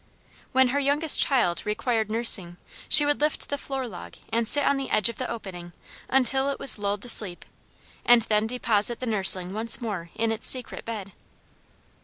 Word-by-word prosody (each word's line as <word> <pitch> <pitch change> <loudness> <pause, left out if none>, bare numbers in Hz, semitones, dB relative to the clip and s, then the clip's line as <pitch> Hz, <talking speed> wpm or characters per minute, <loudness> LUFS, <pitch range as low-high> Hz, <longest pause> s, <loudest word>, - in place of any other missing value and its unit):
When 260 -1 +2
her 280 +3 -2
youngest 285 +2 +3
child 235 -11 +1
required 220 0 -3
nursing 210 -6 +1 0.3
she 295 -1 +8
would 290 0 -2
lift 300 0 -3
the 285 - -3
floor 270 -2 -6
log 190 -6 -12 0.2
and 230 0 -1
sit 290 +4 +5
on 280 - +1
the 275 - -6
edge 215 - +2
of 235 - -10
the 255 - -5
opening 175 -6 -9 0.4
until 265 +1 0
it 280 - -4
was 255 - +3
lulled 205 0 -4
to 245 - -5
sleep, 195 -6 +1 0.6
and 240 -1 +3
then 215 0 -1
deposit 230 -2 0
the 255 - -6
nursling 190 -4 +3
once 225 +2 0
more 200 -8 -7
in 225 0 -2
its 220 - +1
secret 255 -2 -1
bed. 210 -4 -7
230 Hz, 185 wpm, -24 LUFS, 205-265 Hz, 0.6 s, she